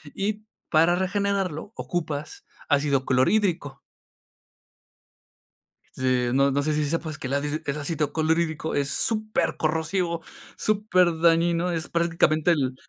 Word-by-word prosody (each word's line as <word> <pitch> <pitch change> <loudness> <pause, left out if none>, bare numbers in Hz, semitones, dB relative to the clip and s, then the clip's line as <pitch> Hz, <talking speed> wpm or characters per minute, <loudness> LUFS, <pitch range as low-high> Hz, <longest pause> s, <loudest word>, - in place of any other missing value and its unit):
Y, 210 +2 -2 0.2
para 165 +2 +4
regenerarlo 195 -1 -1
ocupas 155 -4 -4 0.2
ácido 140 -2 +2
clorhídrico. 145 +1 +1 2.2
Este, 125 -2 +1
no 140 +2 +3
no 140 +1 0
sé 155 - 0
si 150 0 0
sepas 160 0 -3
que - - -5
el 130 - -2
adid 145 +2 -1
el 140 - -1
ácido 150 0 -2
clorhídrico 160 0 0
es 140 -1 0
supercorrosivo, 170 -4 -1 0.3
superdañino, 175 -4 +2
es 165 -2 -2
prácticamente 170 -1 +2
el 135 -5 0
160 Hz, 110 wpm, -25 LUFS, 145-175 Hz, 2.2 s, para